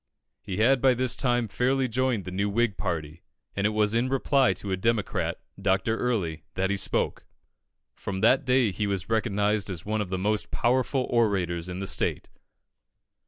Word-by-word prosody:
He 95 Hz, -, -5 dB
had 125 Hz, +4 st, +4 dB
by 130 Hz, -2 st, +5 dB
this 125 Hz, -1 st, 0 dB
time 120 Hz, -3 st, +1 dB
fairly 130 Hz, +5 st, +1 dB
joined 125 Hz, -3 st, 0 dB
the 90 Hz, -, -5 dB
new 100 Hz, +2 st, 0 dB
Whig 115 Hz, 0 st, +1 dB
party, 80 Hz, -2 st, -4 dB, 0.3 s
and 100 Hz, +1 st, +1 dB
it -, -, +1 dB
was 105 Hz, 0 st, +1 dB
in 120 Hz, +3 st, +1 dB
reply 135 Hz, 0 st, +3 dB
to 100 Hz, -, -6 dB
a -, -, +2 dB
Democrat, 110 Hz, +2 st, -1 dB, 0.2 s
Dr. 95 Hz, +3 st, +1 dB
Early, 100 Hz, -11 st, -1 dB
that 95 Hz, +1 st, 0 dB
he -, -, +1 dB
spoke. 95 Hz, -, -1 dB, 0.7 s
From 95 Hz, -1 st, -5 dB
that 130 Hz, +5 st, +4 dB
day 125 Hz, -4 st, +3 dB
he 100 Hz, +3 st, -2 dB
was 100 Hz, +1 st, -3 dB
recognised 105 Hz, -2 st, +1 dB
as 90 Hz, -3 st, -6 dB
one 110 Hz, +1 st, -1 dB
of 100 Hz, -, -4 dB
the 95 Hz, -, -2 dB
most 105 Hz, +3 st, -1 dB
powerful 130 Hz, +2 st, +1 dB
orators 95 Hz, -7 st, +1 dB
in 90 Hz, +1 st, -5 dB
the -, -, -2 dB
state. -, -, -1 dB
105 Hz, 180 wpm, -27 LUFS, 95-120 Hz, 0.7 s, by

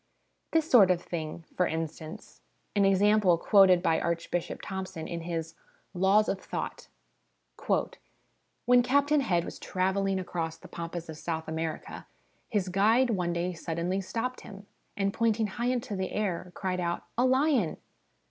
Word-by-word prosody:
This 320 Hz, -1 st, +1 dB
sort 220 Hz, -, +7 dB
of 180 Hz, -2 st, +3 dB
thing, 165 Hz, -1 st, -5 dB
for 180 Hz, -, +2 dB
instance, 160 Hz, 0 st, -6 dB, 0.3 s
an 200 Hz, -1 st, +4 dB
example 195 Hz, -2 st, +4 dB
quoted 185 Hz, -1 st, +5 dB
by 165 Hz, -3 st, +3 dB
Archbishop 170 Hz, 0 st, -2 dB
Thompson 190 Hz, -4 st, -5 dB
in 170 Hz, -1 st, -4 dB
his 165 Hz, -1 st, -4 dB, 0.4 s
Laws 195 Hz, +3 st, +4 dB
of 195 Hz, -, -2 dB
Thought -, -, -5 dB, 0.8 s
1: -, -, +1 dB, 0.8 s
"When 245 Hz, 0 st, +6 dB
Captain 285 Hz, +4 st, +3 dB
Head 175 Hz, -9 st, +1 dB
was -, -, -8 dB
travelling 190 Hz, +1 st, 0 dB
across 165 Hz, -3 st, -4 dB
the -, -, -13 dB
pampas 170 Hz, 0 st, -6 dB
of 160 Hz, -1 st, -8 dB
South 160 Hz, -1 st, -3 dB
America, 160 Hz, 0 st, -5 dB, 0.4 s
his 200 Hz, -5 st, 0 dB
guide 220 Hz, +7 st, +3 dB
one 180 Hz, -5 st, 0 dB
day 175 Hz, +1 st, -1 dB
suddenly 170 Hz, +3 st, -2 dB
stopped 235 Hz, +6 st, -3 dB
him, 200 Hz, -1 st, -11 dB, 0.3 s
and 200 Hz, 0 st, 0 dB
pointing 225 Hz, -1 st, +1 dB
high 235 Hz, +4 st, -3 dB
into 245 Hz, -4 st, -1 dB
the 190 Hz, -1 st, -3 dB
air, 185 Hz, -4 st, -2 dB
cried 185 Hz, -2 st, -2 dB
out 175 Hz, -1 st, -2 dB
' -, -, -43 dB
A -, -, +4 dB
lion 260 Hz, -, +2 dB
185 Hz, 155 wpm, -29 LUFS, 170-215 Hz, 0.8 s, sort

